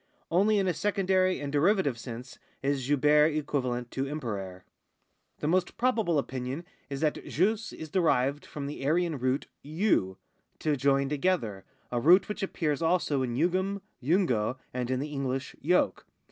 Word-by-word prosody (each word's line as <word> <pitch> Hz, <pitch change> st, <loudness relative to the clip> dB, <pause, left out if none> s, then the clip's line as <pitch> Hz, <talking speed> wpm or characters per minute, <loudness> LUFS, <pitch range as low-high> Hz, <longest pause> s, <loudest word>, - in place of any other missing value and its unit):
Only 205 Hz, +5 st, +4 dB
in 195 Hz, -, +2 dB
a 180 Hz, -, +2 dB
secondary 185 Hz, 0 st, +1 dB
and 140 Hz, -1 st, -4 dB
derivative 160 Hz, -, +3 dB
sense 120 Hz, +1 st, -8 dB, 0.2 s
is 135 Hz, -1 st, -1 dB
jubere 150 Hz, +1 st, +5 dB
equivalent 125 Hz, -5 st, -2 dB
to 135 Hz, -, -2 dB
imperare. 100 Hz, -11 st, -5 dB, 0.8 s
The 150 Hz, -, -1 dB
most 180 Hz, +2 st, +1 dB
probable 225 Hz, -9 st, +2 dB
opinion 130 Hz, +3 st, -3 dB, 0.2 s
is 140 Hz, 0 st, -4 dB
that 155 Hz, -2 st, 0 dB
jus 220 Hz, +6 st, 0 dB
is 155 Hz, -2 st, -9 dB
derived 145 Hz, -5 st, +2 dB
from 145 Hz, -2 st, -7 dB
the 140 Hz, -1 st, -6 dB
Aryan 160 Hz, +1 st, +1 dB
root 130 Hz, +2 st, 0 dB, 0.2 s
YU, 155 Hz, -, 0 dB, 0.4 s
to 150 Hz, -1 st, 0 dB
join 140 Hz, 0 st, +2 dB
together 135 Hz, -, -1 dB, 0.3 s
(a 120 Hz, -, 0 dB
root 180 Hz, +8 st, +6 dB
which 210 Hz, 0 st, -5 dB
appears 160 Hz, -6 st, -1 dB
also 165 Hz, -4 st, +1 dB
in 120 Hz, -2 st, -2 dB
jugem. 185 Hz, +6 st, 0 dB, 0.2 s
jungo, 130 Hz, -, +1 dB, 0.2 s
and 125 Hz, -1 st, -2 dB
in 130 Hz, -1 st, 0 dB
the 150 Hz, +2 st, -4 dB
English 135 Hz, -1 st, -3 dB
yoke). 180 Hz, +5 st, +1 dB
145 Hz, 155 wpm, -29 LUFS, 130-180 Hz, 0.8 s, root